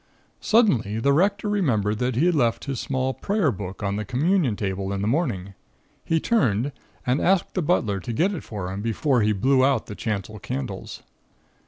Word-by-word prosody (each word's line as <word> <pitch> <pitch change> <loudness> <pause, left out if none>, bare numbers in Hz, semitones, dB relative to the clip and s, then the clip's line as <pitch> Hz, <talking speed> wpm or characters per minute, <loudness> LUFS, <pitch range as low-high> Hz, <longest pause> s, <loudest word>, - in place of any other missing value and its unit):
"Suddenly, 130 - +2
the 140 +5 +2
Rector 200 +7 +2
remembered 110 - +1
that 125 -1 0
he 145 +8 +2
had 180 - +3
left 120 -7 +1
his 135 -4 -3
small 130 -1 -1
prayer 200 -5 0
book 100 -1 -7
on 100 0 -1
the 105 - -2
Communion 140 - +1
table 95 -1 -3
in 100 0 -2
the - - 0
morning; 110 - -1 0.5
he 165 - +1
turned, 140 - +1 0.3
and 125 +3 +1
asked 190 0 +2
the 185 - 0
butler 115 - +1
to 105 - -5
get 175 - +1
it 175 - -4
for 100 -4 -5
him 95 +1 -4
before 120 +3 +1
he 105 0 +3
blew 130 +6 +3
out 135 -4 +2
the - - -7
chancel 105 0 -4
candles. 70 -7 -5
125 Hz, 190 wpm, -24 LUFS, 105-160 Hz, 0.5 s, had